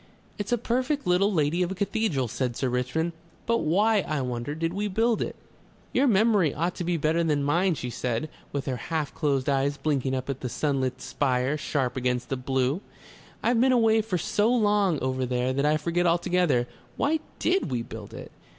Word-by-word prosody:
"It's 205 +2 -3
a 240 - +3
perfect 255 +5 -1
little 180 +3 +3
lady 160 0 +1
of 180 - +1
a 190 - -4
cathedral," 195 - 0
said 125 +1 -2
Sir 130 - 0
Richmond. 125 +7 -1 0.3
"But 230 0 +2
why, 205 +7 +3
I 155 -6 -2
wonder, 125 +3 -3
did 165 +1 -2
we 205 +2 -1
build 225 +3 +1
it?" - - -3 0.6
"Your 280 - +3
memory 210 - +3
ought 170 +4 0
to - - -2
be 175 0 0
better 160 +2 +1
than 150 -3 +1
mine," 170 +5 +2
she 125 -3 -5
said, 120 +4 -2 0.2
with 140 -1 -3
her 130 -2 -2
half 155 +3 -3
closed 140 -4 0
eyes 140 0 +1
blinking 135 -4 0
up 130 0 -3
at 135 -1 -3
the 125 - -4
sunlit 130 -1 -1
spire 130 0 0
sharp 140 -4 -1
against 125 -1 -1
the 135 - 0
blue. 130 +5 0 0.6
"I've 235 -1 +3
been 260 +1 +4
away 225 -3 +4
for 210 -4 -2
so 210 +7 +1
long 205 - +2
over 130 0 -1
there 125 +1 0
that 140 +2 +1
I 155 +1 +3
forget 170 +3 0
altogether. 170 -7 +2 0.3
Why 310 +3 +1 0.2
DID 360 - +1
we 120 -3 -1
build 110 -3 -9
it?" - - -9
155 Hz, 195 wpm, -26 LUFS, 130-200 Hz, 0.6 s, been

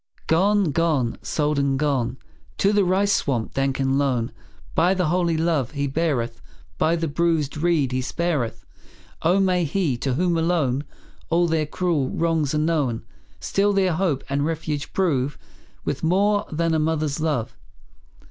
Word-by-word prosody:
Gone, 195 +1 +3
gone, 145 -6 0
sold 150 -1 0
and 140 -1 +1
gone, 130 -4 0 0.4
To 200 +1 +3
the 205 -1 +4
rice 195 +2 +2
swamp 125 -11 -1
dank 135 0 0
and 135 0 +1
lone. 125 -4 0 0.4
By 180 +4 +3
the 180 -4 0
holy 170 -1 +1
love 160 -5 0
He 140 -1 -1
beareth; 135 -6 -1 0.4
By 165 +2 +3
the 165 -1 -1
bruised 160 -1 0
reed 155 -4 +1
He 130 0 0
spareth; 130 -5 -2 0.6
Oh, 180 +4 +3
may 185 -2 +2
He, 160 -4 0
to 130 +1 -1
whom 170 +1 +1
alone 155 -5 +1 0.4
All 170 +1 +3
their 160 -2 0
cruel 155 -5 0
wrongs 160 -3 0
are - - +2
known, 150 -8 0 0.3
Still 205 +1 +1
their 190 -3 +2
hope 160 -5 0
and 140 +1 0
refuge 155 -2 -3
prove, 145 -7 0 0.5
With - - -2
a - - -1
more 205 +4 +2
than 160 0 +1
mother's 155 -1 0
love. 150 -8 -1
155 Hz, 155 wpm, -23 LUFS, 140-170 Hz, 0.6 s, the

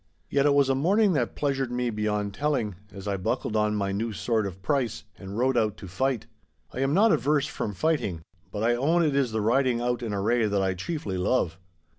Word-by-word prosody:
Yet 140 +1 +3
it 140 - +4
was 140 -1 +4
a 135 - +3
morning 190 +9 +3
that 125 -6 -1
pleasured 135 -3 -1
me 125 -1 -1
beyond 105 -1 -1
telling, 140 -6 -1 0.2
as 100 0 -9
I 100 -1 0
buckled 95 +3 -2
on 105 0 +2
my 100 -1 -1
new 110 +3 -2
sword 110 -1 0
of 95 -1 -8
price, 125 0 0
and 100 +1 -8
rode 130 +2 +2
out 110 -4 +1
to 95 - -9
fight. 125 +6 -1 0.5
I - - -5
am 135 +3 +1
not 215 +3 +5
averse 145 +3 +2
from 110 -7 -4
fighting, 105 - 0 0.3
but 105 0 -3
I 120 +1 +3
own 160 +8 +2
it 145 -3 +1
is 135 -4 +1
the 110 0 -1
riding 125 +2 +2
out 120 0 -1
in 115 -3 -3
array 110 +3 +1
that 100 -1 +1
I 95 -1 +1
chiefly 95 - -4
love. 90 -4 0
120 Hz, 220 wpm, -26 LUFS, 105-140 Hz, 0.5 s, not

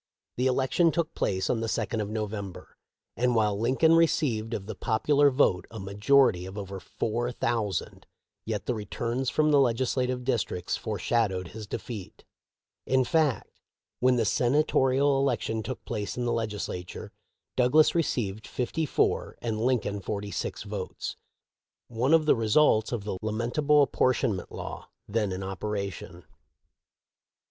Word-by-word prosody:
The 125 +2 +1
election 135 +6 +2
took 170 -1 -1
place 95 -1 -1
on 120 - 0
the 115 - -2
second 110 0 -1
of 105 - -3
November, 105 -3 -5 0.4
and 125 0 +1
while 105 -2 +2
Lincoln 130 +8 +3
received 130 -9 +2
of 95 - -5
the 110 - -5
popular 140 +7 +3
vote 115 - +2
a 115 - -8
majority 100 0 +3
of 95 +2 -9
over 100 -1 -6
four 120 +6 -2
thou 115 -3 0
sand, 95 - -5 0.4
yet 105 -4 -3
the 125 - 0
returns 115 +4 -2
from 155 0 +2
the 145 - +5
legislative 125 0 +1
districts 115 -8 -1
foreshadowed 105 -3 -1
his 110 -1 -8
defeat. 105 -3 -7 0.6
In 130 0 +3
fact, 150 -1 0 0.4
when 130 0 +4
the 115 -2 +1
Sena 125 +8 +3
torial 135 0 +2
election 120 -4 0
took 120 +4 -6
place 105 -2 -4
in 125 - -1
the 120 - +1
Legislature, 105 -5 -4 0.4
Douglas 130 +5 +4
received 110 - -1
fifty 150 +6 -2
four - - 0
and 110 -2 -2
Lincoln 115 -5 0
forty 100 +1 -4
six - - -4
votes - - -5 0.4
— - - -65 0.2
one 125 +7 +3
of 160 -1 +3
the - - +5
results 110 0 +3
of 120 -5 -2
the 100 -3 -4
lamentable 120 +7 +2
appor 130 -1 +2
tionment 105 -9 -1
law - - -7 0.2
then 105 -1 0
in 95 +1 -4
operation. 95 -2 -5
115 Hz, 150 wpm, -28 LUFS, 105-130 Hz, 0.6 s, the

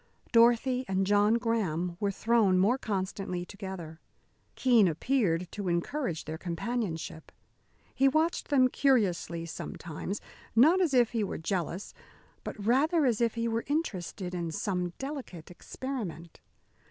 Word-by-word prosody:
Dorothy 240 +2 +4
and 190 0 +1
John 205 +2 +4
Graham 190 -8 -1
were 205 - +1
thrown 210 -2 +3
more 220 +8 +3
constantly 190 -3 -3
together. 190 -5 -8 0.6
Keene 240 -6 +5
appeared 180 - +1
to 200 -2 -5
encourage 175 - -1
their 160 +1 -5
companionship. 175 -3 -4 0.6
He 270 +1 +3
watched 315 +5 +1
them 265 -3 +4
curiously, 200 -11 +1
sometimes, 170 +3 -6 0.4
not 315 +11 +6
as 315 -7 +2
if 240 -3 +4
he 230 -3 0
were 200 - -3
jealous, 175 +2 -3 0.5
but - - -6
rather 295 +7 +3
as 240 -3 +1
if 230 -1 +1
he 230 0 -1
were 230 0 -1
interested 195 - -3
in 170 -2 -2
some 180 +1 -2
delicate 265 - -7
experiment. 180 -6 -6
205 Hz, 130 wpm, -29 LUFS, 175-250 Hz, 0.6 s, not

